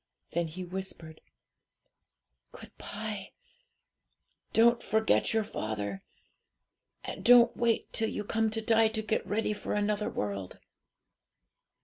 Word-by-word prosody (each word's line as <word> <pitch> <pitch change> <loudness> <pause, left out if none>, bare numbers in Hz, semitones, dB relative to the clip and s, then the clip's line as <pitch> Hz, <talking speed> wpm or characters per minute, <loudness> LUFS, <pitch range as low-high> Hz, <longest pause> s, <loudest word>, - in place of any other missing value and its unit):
Then 170 0 0
he 180 +4 -7
whispered 175 -3 -7 1.3
'"Good - - -13
bye! 210 -2 -6 1.2
don't 235 +1 +4
forget 220 +2 +2
your 225 -1 +2
father; 105 - -4 1.0
and - - -6
don't 240 0 +7
wait 235 -1 0
till 225 -1 +1
you - - -4
come 225 +1 0
to 225 +1 -2
die 225 0 +4
to 220 0 -3
get 220 +1 -1
ready 210 +1 0
for 210 - -4
another 210 0 0
world." 100 -2 -4
210 Hz, 115 wpm, -30 LUFS, 170-225 Hz, 1.3 s, don't